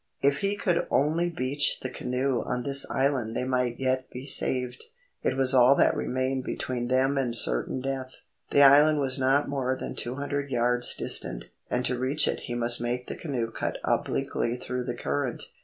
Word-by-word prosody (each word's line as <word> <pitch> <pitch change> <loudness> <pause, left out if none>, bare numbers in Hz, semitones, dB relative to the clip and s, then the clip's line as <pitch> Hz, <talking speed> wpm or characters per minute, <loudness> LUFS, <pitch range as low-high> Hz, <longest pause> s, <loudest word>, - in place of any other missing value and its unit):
If 140 0 +3
he 200 +1 0
could 175 -4 0
only 160 +5 +1
beach 145 -2 +1
the 130 - -4
canoe 125 0 -1
on 125 0 -3
this 140 0 +2
island 130 -5 0
they - - -1
might 125 -2 -1
yet 130 0 -1
be 125 +2 -8
saved. 125 -2 -2 0.4
It 130 - -1
was 135 0 +2
all 130 +1 +6
that - - +3
remained 130 +1 -2
between 125 -1 -3
them 130 +2 +2
and 120 -3 -1
certain - - +1
death. 130 -1 -4 0.3
The 140 - +5
island 145 +2 +6
was 135 -1 0
not 135 +2 +2
more 130 -2 -1
than - - -5
two 120 +2 -4
hundred 140 0 -3
yards 120 -1 +3
distant, - - -1 0.2
and 125 0 -1
to 125 -1 -1
reach 135 +4 +1
it - - -1
he 120 - -2
must 120 0 +1
make 120 +1 -2
the - - -6
canoe 125 -8 -3
cut - - -3
obliquely 120 - -1
through 125 0 -4
the 120 -1 -3
current. 130 0 -2
130 Hz, 190 wpm, -27 LUFS, 125-140 Hz, 0.4 s, all